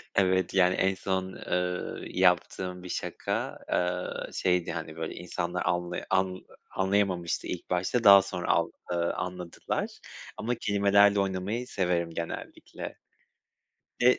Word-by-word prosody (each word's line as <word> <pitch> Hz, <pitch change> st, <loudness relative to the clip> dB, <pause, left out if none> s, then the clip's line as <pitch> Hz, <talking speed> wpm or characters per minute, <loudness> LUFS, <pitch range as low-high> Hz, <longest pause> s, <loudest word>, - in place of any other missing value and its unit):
Evet, 95 Hz, -2 st, +2 dB
yani 95 Hz, -1 st, +4 dB
en 95 Hz, 0 st, +2 dB
son, 95 Hz, 0 st, -2 dB, 0.2 s
eee, 90 Hz, 0 st, -2 dB
yaptığım 90 Hz, 0 st, +2 dB
bir 90 Hz, -, -8 dB
şaka, -, -, -3 dB
eee, 90 Hz, 0 st, -1 dB
şeydi, 90 Hz, -2 st, +1 dB
hani, 80 Hz, -1 st, -5 dB
böyle 80 Hz, -1 st, -4 dB
insanlar 90 Hz, 0 st, -3 dB
anla 90 Hz, 0 st, 0 dB
an 95 Hz, -1 st, 0 dB, 0.3 s
anlayamamıştı 95 Hz, -3 st, 0 dB
ilk -, -, -5 dB
başta. 90 Hz, +7 st, 0 dB
Daha 100 Hz, -1 st, +10 dB
sonra 90 Hz, -2 st, -5 dB
al -, -, +2 dB, 0.2 s
ııı, 85 Hz, 0 st, 0 dB
anladılar 90 Hz, -1 st, -3 dB, 0.5 s
ama 120 Hz, +2 st, -1 dB
kelimelerle 100 Hz, -1 st, +4 dB
oynamayı 100 Hz, +6 st, -1 dB
severim 90 Hz, -5 st, 0 dB
genellikle. 85 Hz, 0 st, -6 dB, 1.1 s
Ve 125 Hz, +1 st, +6 dB
90 Hz, 125 wpm, -28 LUFS, 90-95 Hz, 1.1 s, Daha